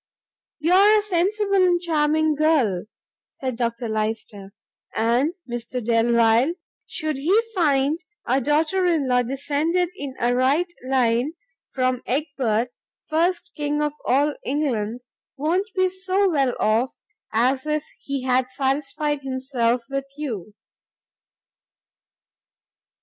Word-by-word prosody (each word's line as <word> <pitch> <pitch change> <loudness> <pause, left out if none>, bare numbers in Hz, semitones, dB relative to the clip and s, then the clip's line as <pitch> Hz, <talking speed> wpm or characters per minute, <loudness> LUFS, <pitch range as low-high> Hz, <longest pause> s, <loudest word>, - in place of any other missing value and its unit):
"You 325 +4 +1
are 410 +3 +7
a - - +3
sensible 400 +2 +1
and 350 -1 +3
charming 315 -2 +2
girl," 285 - +2 0.5
said 260 -2 -4
Dr 235 0 -2
Lyster, 215 -2 -3 0.4
"and 245 - +1
Mr 240 +1 -4
Delvile, 235 +4 +3 0.3
should 310 -4 -1
he 350 +10 +3
find 295 -4 +2 0.3
a 260 +3 +2
daughter 310 +7 +1
in 320 -6 +1
law 250 -1 +3
descended 295 +7 0
in 280 -7 -6
a 240 +1 +2
right 285 +8 +2 0.2
line 250 +2 +2 0.4
from 255 -1 0
Egbert, 250 -5 0 0.4
first 340 +3 0
king 295 -1 -1
of 295 -1 -1
all 285 +4 +2
England, 250 -5 -1 0.4
won't 350 +8 0
be 370 0 +3
so 375 +2 +1
well 275 -8 +1
off 225 +4 +2 0.4
as 260 +5 +1
if 305 0 -1
he 275 -2 -4
had 255 0 +1
satisfied 290 +2 -1
himself 260 -3 -1
with 275 0 -3
you. 215 - -5
275 Hz, 115 wpm, -23 LUFS, 245-315 Hz, 0.5 s, are